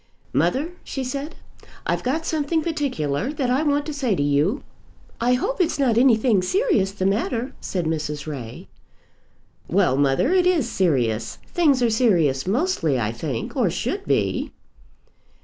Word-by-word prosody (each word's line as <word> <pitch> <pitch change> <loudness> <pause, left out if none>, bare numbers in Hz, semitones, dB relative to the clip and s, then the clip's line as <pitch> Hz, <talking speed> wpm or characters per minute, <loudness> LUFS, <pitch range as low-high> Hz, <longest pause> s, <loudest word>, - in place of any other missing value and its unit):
"Mother," 260 - +1
she 270 - -4
said, 275 +4 -5 0.5
"I've - - 0
got 310 +6 -1
something 315 0 0
particular 260 - -1
that 265 -4 -1
I 260 +3 +2
want 290 -1 +1
to 305 - -4
say 260 -8 0
to 145 - 0
you." 145 - +1 0.6
"I 245 +2 +2
hope 390 - 0
it's 345 - +1
not 260 -5 +2
anything 230 -4 +4
serious 225 - +1
the 195 -1 -3
matter," 230 +6 -1
said 180 -3 -3
Mrs. 150 -2 -3
Ray. 130 -7 -7 1.0
"Well, 175 -7 +2
mother, 140 - +2
it 365 -1 +4
is 330 -10 +2
serious. 120 - 0
Things 285 -7 +2
are 235 - +3
serious 175 - +2
mostly, 195 - +1
I 110 -1 -1
think, 120 0 -4
or - - +2
should - - -3
be." - - 0
230 Hz, 150 wpm, -23 LUFS, -, 1.0 s, anything